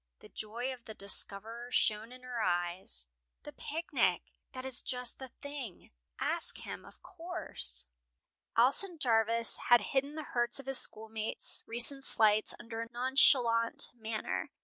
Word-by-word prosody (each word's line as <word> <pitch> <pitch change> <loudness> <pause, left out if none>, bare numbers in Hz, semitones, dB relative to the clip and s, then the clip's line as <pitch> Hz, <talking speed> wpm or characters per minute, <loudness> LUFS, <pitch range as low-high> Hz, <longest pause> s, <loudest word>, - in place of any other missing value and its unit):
The - - -16
joy 235 +5 -5
of 245 -2 -14
the 220 - -9
discoverer 220 +4 -1
shone 220 -1 0
in 255 0 -12
her 250 -2 -4
eyes. 175 - -2 0.4
"The 295 - -10
picnic! 325 +3 -1 0.2
That 255 0 -7
is 260 -2 -3
just 250 -2 0
the 265 - -7 0.2
thing. 280 -9 -8 0.3
Ask - - -1
him, - - -7
of - - -17
course." 60 +2 -6 0.7
Alson 305 +10 +3
Jarvis 230 -4 +2
had 240 -2 +7
hidden 280 +2 0
the 310 - -5
hurts 240 +1 +1
of 275 - -10
his 270 -1 +4
schoolmates' 220 0 0
recent 240 +4 +6
slights 215 -3 +4
under 230 0 -6
a 230 - -7
nonchalant 240 -2 +3
manner. 220 -2 -4
235 Hz, 145 wpm, -32 LUFS, 220-260 Hz, 0.7 s, had